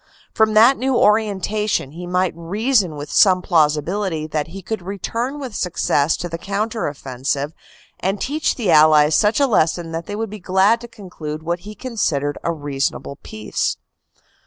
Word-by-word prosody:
From 220 Hz, -1 st, +2 dB
that 235 Hz, +5 st, +6 dB
new 265 Hz, 0 st, 0 dB
orienta 210 Hz, -1 st, +1 dB
tion 135 Hz, -8 st, -1 dB
he 175 Hz, +3 st, -8 dB
might 180 Hz, 0 st, 0 dB
reason 195 Hz, -, 0 dB
with 145 Hz, 0 st, -7 dB
some 185 Hz, -3 st, +5 dB
plausibility 160 Hz, +2 st, +1 dB
that 155 Hz, -1 st, -2 dB
he 190 Hz, +4 st, -9 dB
could 220 Hz, 0 st, -4 dB
return 230 Hz, +9 st, -4 dB
with 260 Hz, -5 st, -6 dB
success 165 Hz, -5 st, +1 dB
to 175 Hz, -, -4 dB
the 165 Hz, -1 st, -6 dB
counter 215 Hz, +4 st, -2 dB
offensive 140 Hz, +1 st, -3 dB, 0.5 s
and 195 Hz, +2 st, -1 dB
teach 300 Hz, +7 st, -1 dB
the 215 Hz, -8 st, 0 dB
Allies 155 Hz, -1 st, +6 dB
such 210 Hz, -, +3 dB
a 280 Hz, -, +4 dB
lesson 170 Hz, -7 st, +1 dB
that 165 Hz, +1 st, -5 dB
they 205 Hz, -, -4 dB
would 220 Hz, -1 st, -4 dB
be 215 Hz, -, -7 dB
glad 190 Hz, +5 st, +2 dB
to 240 Hz, -, -8 dB
conclude 160 Hz, -8 st, -8 dB
what 170 Hz, +2 st, -2 dB
he 210 Hz, -, -9 dB
con 250 Hz, -1 st, -8 dB
sidered 145 Hz, -6 st, 0 dB
a 170 Hz, -, 0 dB
reasonable 140 Hz, -2 st, -3 dB
peace. 105 Hz, 0 st, -3 dB
180 Hz, 175 wpm, -20 LUFS, 155-215 Hz, 0.5 s, that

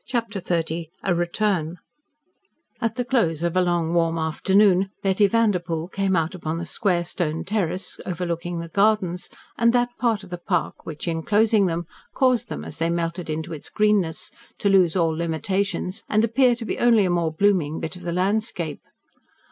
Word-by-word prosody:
CHAPTER 230 Hz, -6 st, -2 dB
XXX 165 Hz, -1 st, -2 dB, 0.2 s
A 190 Hz, -, +2 dB
RETURN 175 Hz, -1 st, 0 dB, 1.0 s
At 230 Hz, -1 st, 0 dB
the 250 Hz, -1 st, -2 dB
close 170 Hz, -, +1 dB
of 170 Hz, 0 st, 0 dB
a 185 Hz, -, +4 dB
long, 175 Hz, -2 st, 0 dB
warm 165 Hz, -1 st, +2 dB
afternoon 190 Hz, +4 st, +3 dB
Betty 195 Hz, +1 st, +3 dB
Vanderpoel 180 Hz, -7 st, 0 dB
came 195 Hz, -1 st, 0 dB
out 165 Hz, -1 st, 0 dB
upon 165 Hz, -3 st, -4 dB
the 170 Hz, -, -4 dB
square 175 Hz, 0 st, 0 dB
stone 160 Hz, -2 st, -2 dB
terrace 185 Hz, -3 st, -2 dB
overlooking 175 Hz, -1 st, -3 dB
the 170 Hz, 0 st, -5 dB
gardens, 185 Hz, -1 st, +1 dB, 0.3 s
and 235 Hz, 0 st, +4 dB
that 245 Hz, 0 st, +1 dB
part 225 Hz, -4 st, +1 dB
of 185 Hz, -, -13 dB
the 175 Hz, -, -5 dB
park 175 Hz, -1 st, -2 dB
which, 155 Hz, +1 st, -6 dB
enclosing 205 Hz, +5 st, +2 dB
them, 170 Hz, 0 st, -2 dB, 0.3 s
caused 255 Hz, -4 st, +2 dB
them, 75 Hz, -, -5 dB
as 80 Hz, -, -9 dB
they 165 Hz, +1 st, +1 dB
melted 170 Hz, 0 st, -2 dB
into 160 Hz, +2 st, -3 dB
its 150 Hz, -, -8 dB
greenness, 210 Hz, -6 st, +1 dB, 0.3 s
to 200 Hz, -, +1 dB
lose 185 Hz, -3 st, +4 dB
all 165 Hz, -3 st, +2 dB
limitations 185 Hz, +3 st, -2 dB
and 215 Hz, +1 st, +3 dB
appear 245 Hz, +2 st, +3 dB
to 235 Hz, -1 st, -7 dB
be -, -, -3 dB
only 230 Hz, -4 st, +5 dB
a 180 Hz, -, +1 dB
more 170 Hz, -2 st, +1 dB
blooming 165 Hz, -3 st, +1 dB
bit 160 Hz, -, -4 dB
of 180 Hz, -, -11 dB
the 175 Hz, -1 st, -3 dB
landscape. 185 Hz, -3 st, -1 dB
180 Hz, 175 wpm, -23 LUFS, 165-210 Hz, 1.0 s, only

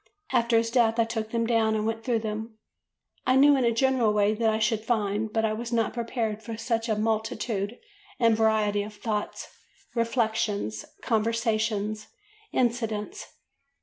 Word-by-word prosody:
After 235 Hz, 0 st, +3 dB
his 230 Hz, 0 st, +1 dB
death 230 Hz, -2 st, +3 dB
I 230 Hz, -, +5 dB
took 225 Hz, -1 st, -3 dB
them 230 Hz, 0 st, 0 dB
down 225 Hz, -2 st, +2 dB
and 215 Hz, 0 st, -1 dB
went 225 Hz, 0 st, -2 dB
through 235 Hz, -3 st, 0 dB
them. 220 Hz, +1 st, -5 dB, 0.7 s
I 255 Hz, -, +4 dB
knew 285 Hz, +2 st, +7 dB
in 265 Hz, -, +1 dB
a 235 Hz, -, +3 dB
general 245 Hz, -2 st, +2 dB
way 210 Hz, 0 st, +3 dB
what 225 Hz, +1 st, +1 dB
I 220 Hz, -, +1 dB
should 220 Hz, 0 st, 0 dB
find, 215 Hz, -2 st, 0 dB
but 225 Hz, 0 st, +1 dB
I 215 Hz, -, 0 dB
was 230 Hz, +2 st, -5 dB
not 230 Hz, -2 st, +1 dB
prepared 230 Hz, -2 st, -2 dB
for 225 Hz, 0 st, -6 dB
such 230 Hz, 0 st, -1 dB
a 215 Hz, -, +2 dB
multitude 220 Hz, 0 st, -1 dB, 0.4 s
and 230 Hz, -2 st, +4 dB
variety 215 Hz, -2 st, +2 dB
of 210 Hz, +1 st, -7 dB
thoughts, 210 Hz, 0 st, -3 dB, 0.5 s
reflections, 220 Hz, -, -1 dB, 0.2 s
conversations, 220 Hz, -2 st, 0 dB, 0.4 s
incidents. 235 Hz, -, -1 dB
225 Hz, 160 wpm, -27 LUFS, 215-230 Hz, 0.7 s, knew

